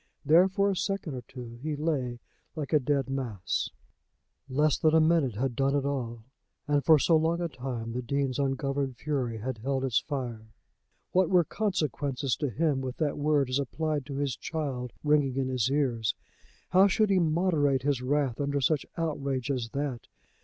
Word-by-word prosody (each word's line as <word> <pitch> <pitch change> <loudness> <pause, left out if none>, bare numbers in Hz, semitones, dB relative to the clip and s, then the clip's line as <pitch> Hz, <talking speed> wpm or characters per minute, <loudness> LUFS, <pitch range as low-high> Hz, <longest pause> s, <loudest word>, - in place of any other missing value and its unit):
There 165 +6 +6
for 200 +1 +2
a - - -1
second 190 -4 -2
or 125 - -5
two 120 -1 -10
he 155 +1 -2
lay 135 -6 -2 0.3
like 155 -1 -4
a 150 - +6
dead 140 -1 0
mass. 120 -9 -2 0.8
Less 150 +2 +3
than 155 -1 +4
a - - +7
minute 155 -7 +3
had 125 +2 -1
done 135 +2 +1
it 140 -1 0
all, 120 -5 -3 0.4
and 145 -1 +2
for 160 -1 +7
so 165 +3 +3
long 165 +2 +2
a 175 - 0
time 125 -6 -5
the 125 - -2
Dean's 135 +1 -1
ungoverned 135 -1 -1
fury 130 -7 -2
had 115 +1 -4
held 135 +3 -1
its 125 -4 +2
fire. 120 -6 -5 0.6
What 185 -2 +3
were 180 -2 +5
consequences 145 - -1
to 145 - -1
him 145 +1 0
with 130 -1 -5
that 150 -3 0
word 145 -2 +2
as 130 - +2
applied 145 +1 -2
to 140 - -5
his 140 -3 -1
child 135 -6 -4
ringing 145 -3 +3
in 135 -1 0
his 130 -2 +1
ears? 125 -6 0 0.5
How 190 +3 +6
should 210 +1 +2
he 190 - +4
moderate 155 -5 +2
his 140 -3 +1
wrath 135 -1 0
under 140 0 0
such 145 +1 +1
outrage 140 -5 -1
as 125 -4 -2
that? 135 -2 -4
140 Hz, 180 wpm, -29 LUFS, 130-155 Hz, 0.8 s, a